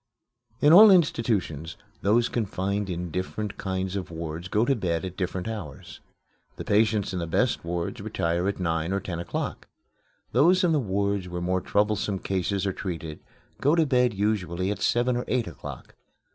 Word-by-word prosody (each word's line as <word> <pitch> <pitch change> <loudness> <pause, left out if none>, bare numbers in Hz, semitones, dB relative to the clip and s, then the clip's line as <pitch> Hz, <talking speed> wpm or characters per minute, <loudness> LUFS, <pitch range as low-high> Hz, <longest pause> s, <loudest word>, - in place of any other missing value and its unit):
In 150 +2 +6
all 210 +4 +10
institutions 110 - +1 0.2
those 115 +4 +3
confined 100 -2 -2
in 90 -1 -4
different 95 +4 -4
kinds 95 0 -2
of 95 -2 -4
wards 85 +1 -5
go 105 +5 +2
to 135 - +2
bed 90 -5 -1
at 90 -1 -6
different 90 0 -3
hours. 100 -11 -7 0.6
The - - -6
patients 105 -1 +2
in 90 - -2
the 85 - -3
best 125 +9 +1
wards 85 0 -3
retire 85 +2 -1
at 100 - -2
nine 85 0 -1
or 100 - +1
ten 90 -3 -5
o'clock. 85 - -4 0.6
Those 175 - +4
in 175 - +3
the 155 - +3
wards 100 -4 -1
where 90 0 -4
more 90 +1 0
troublesome 105 0 0
cases 95 +1 -1
are 95 - 0
treated 85 -5 -5 0.4
go 145 +4 +3
to 165 -2 +3
bed 125 -4 +2
usually 95 -3 -1
at 105 - -5
seven 120 +1 +2
or 120 - -2
eight 125 -2 0
o'clock. - - -9
100 Hz, 170 wpm, -26 LUFS, 90-115 Hz, 0.6 s, all